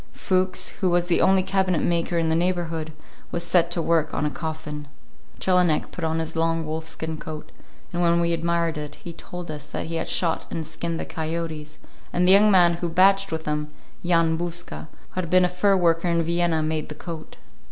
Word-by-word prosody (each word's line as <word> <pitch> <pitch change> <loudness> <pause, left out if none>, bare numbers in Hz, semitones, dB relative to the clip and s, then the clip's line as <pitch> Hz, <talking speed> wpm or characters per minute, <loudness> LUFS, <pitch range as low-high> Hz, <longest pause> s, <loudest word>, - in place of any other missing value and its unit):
Fuchs, 185 -1 0
who 185 - +3
was 175 0 +2
the 175 -1 +2
only 190 -1 +4
cabinet 185 -4 +1
maker 170 0 0
in 165 -1 +1
the 160 - +2
neighborhood, 165 -2 -1 0.4
was 170 - 0
set 170 -1 +4
to 170 -1 0
work 165 -2 +1
on 150 - 0
a 150 - 0
coffin. 155 -2 -5 0.5
Jelinek 180 -4 +2
put 175 - -7
on 160 0 0
his 160 0 -3
long 165 0 +1
wolfskin 160 0 -4
coat, 155 -1 -8 0.4
and 175 - -1
when 170 0 +3
we 170 0 +1
admired 170 -1 0
it, 150 -1 -7
he 170 - -9
told 175 0 -8
us 150 -1 -7
that - - -4
he 165 0 -3
had - - -3
shot 165 -3 +1
and 160 -1 -4
skinned 165 +1 -4
the - - -3
coyotes, 160 -2 -4 0.3
and 180 +1 +2
the - - +6
young 205 +2 +7
man 175 -3 +5
who 175 0 -2
"batched" 195 +3 +4
with 160 0 -3
him, 150 0 -1 0.4
Jan 165 -2 +2
Bouska, 170 -2 -4 0.2
who 185 - -2
had 170 - -6
been 185 +1 +5
a - - +3
fur 190 +2 +2
worker 170 -1 +2
in 170 -1 +2
Vienna, 170 -1 +1
made 155 0 -2
the 150 - -7
coat. 160 0 -8
170 Hz, 205 wpm, -24 LUFS, 160-175 Hz, 0.5 s, young